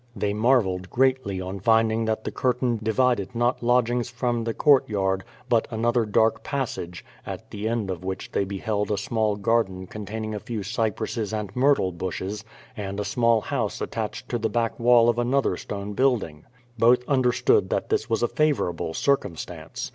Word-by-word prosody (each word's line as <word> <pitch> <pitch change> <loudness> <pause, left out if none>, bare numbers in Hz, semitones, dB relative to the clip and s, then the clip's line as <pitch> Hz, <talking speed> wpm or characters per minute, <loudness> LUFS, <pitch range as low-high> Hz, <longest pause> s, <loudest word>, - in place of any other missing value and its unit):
They 100 -1 -1
marvelled 105 -5 +2
greatly 130 -7 +1
on 95 +1 -5
finding 115 +2 +3
that 110 0 -1
the - - -3
curtain 125 -2 0
divided 115 -1 +1
not 120 +2 +1
lodgings 120 0 +2
from 120 -1 -1
the 115 - -1
courtyard, 100 -9 +3 0.2
but 115 -2 +2
another 115 0 +1
dark 110 +2 +2
passage, 115 -11 -4 0.2
at - - -8
the 105 +1 -3
end 115 -5 -1
of 90 -1 -6
which 95 0 -5
they - - +1
beheld 100 +2 -2
a 105 - 0
small 110 -3 0
garden 100 -3 0
con 105 +2 -8
taining 110 0 -4
a 105 - -3
few 110 -1 -5
cypresses 110 +1 -2
and 105 -3 -4
myrtle 130 -7 +3
bushes, 95 +4 -4 0.3
and 100 -2 -5
a 105 - -2
small 115 +1 +2
house 115 -4 -2
attached 115 +2 -4
to 120 - -1
the 110 0 0
back 115 -1 -1
wall 120 -1 +5
of 120 0 +2
another 125 -4 +1
stone 100 +2 -6
building. 105 - 0 0.3
Both 125 +2 +4
understood 130 -3 +3
that - - -1
this - - 0
was 115 +1 0
a - - +4
favorable 105 - 0
circumstance. 105 - -2
110 Hz, 170 wpm, -25 LUFS, 100-120 Hz, 0.3 s, wall